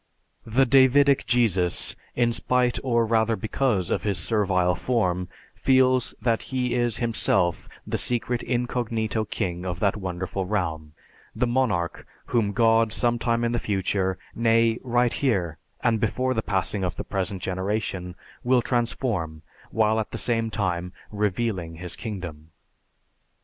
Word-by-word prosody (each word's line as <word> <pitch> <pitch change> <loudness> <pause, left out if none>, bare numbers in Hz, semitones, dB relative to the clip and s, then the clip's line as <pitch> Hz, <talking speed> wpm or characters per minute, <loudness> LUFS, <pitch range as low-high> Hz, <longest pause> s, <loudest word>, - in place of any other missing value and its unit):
The 125 +5 +3
Davidic 135 +2 +4
Jesus, 95 - +1 0.2
in 120 -1 +2
spite 125 +1 +1
or 120 -3 +2
rather 110 0 +2
because 110 -4 -1
of - - +1
his 100 -3 -1
servile 90 -2 +1
form, 90 -4 -1 0.2
feels 130 -2 +3
that 115 0 +1
he 125 -2 -1
is 120 -2 +1
himself 95 -7 +1 0.2
the - - -2
secret 120 0 0
incognito 115 -3 -1
king 90 -3 -3
of 90 -2 -4
that 100 -1 +2
wonderful 95 0 -3
realm, 80 -6 -3 0.4
the - - +1
monarch 120 -9 -1 0.2
whom 110 -4 +1
God 115 +1 +3
some 120 +2 +1
time 115 0 0
in 115 - +1
the 120 - 0
future, 95 -2 -1 0.2
nay, 115 0 +2
right 120 -1 +1
here 90 - 0 0.2
and 115 -2 +2
before 130 +3 0
the 110 - 0
passing 95 -1 -1
of 90 -1 -2
the - - -5
present 95 -1 -2
generation, 95 -1 -3 0.3
will 125 -1 +3
transform 115 -10 -1 0.3
while 110 0 +2
at 110 - -3
the - - -5
same 115 +1 0
time 90 -4 -2 0.2
"revealing" 105 -4 -2
his 90 +1 -4
kingdom. 85 -8 -7
110 Hz, 140 wpm, -25 LUFS, 95-120 Hz, 0.4 s, Davidic